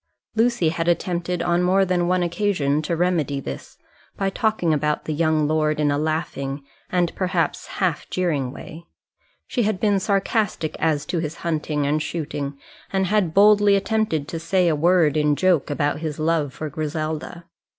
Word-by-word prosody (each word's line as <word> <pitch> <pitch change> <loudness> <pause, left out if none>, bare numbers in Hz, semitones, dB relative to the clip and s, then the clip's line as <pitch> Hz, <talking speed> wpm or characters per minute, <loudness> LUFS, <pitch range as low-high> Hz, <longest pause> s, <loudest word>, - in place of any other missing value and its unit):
Lucy 225 -7 +2
had 165 +1 -2
attempted 175 0 0
on 175 0 +2
more 190 +2 +3
than 175 -1 +1
one 180 0 +2
occasion 175 -5 0
to 170 +2 -2
remedy 165 -5 0
this, 70 - -8 0.4
by 195 -1 0
talking 215 -7 +1
about 150 0 0
the 155 - -2
young 155 -1 +2
lord 155 0 +1
in 145 -1 +2
a 145 - +1
laughing 150 -3 -2 0.3
and, 175 -2 +1
perhaps, 180 -3 -1
half 180 -6 -1
jeering 150 -8 -1
way; 165 +3 -10 0.6
she 245 - -1
had 215 -3 0
been 205 -2 +2
sarcastic 195 -3 0
as 150 -2 +1
to 170 - -2
his 160 0 -4
hunting 150 -3 -1
and 150 +2 +1
shooting, 145 -4 -4 0.3
and 190 -1 +1
had 185 -4 +1
boldly 205 0 +6
attempted 200 -7 0
to 165 - -4
say 180 +2 +1
a 160 - +3
word 165 -1 +3
in 150 -1 +2
joke 180 -3 +2
about 145 0 0
his 155 -2 -4
love 155 -2 0
for 155 - -5
Griselda. 155 +3 -4
165 Hz, 170 wpm, -22 LUFS, 150-185 Hz, 0.6 s, boldly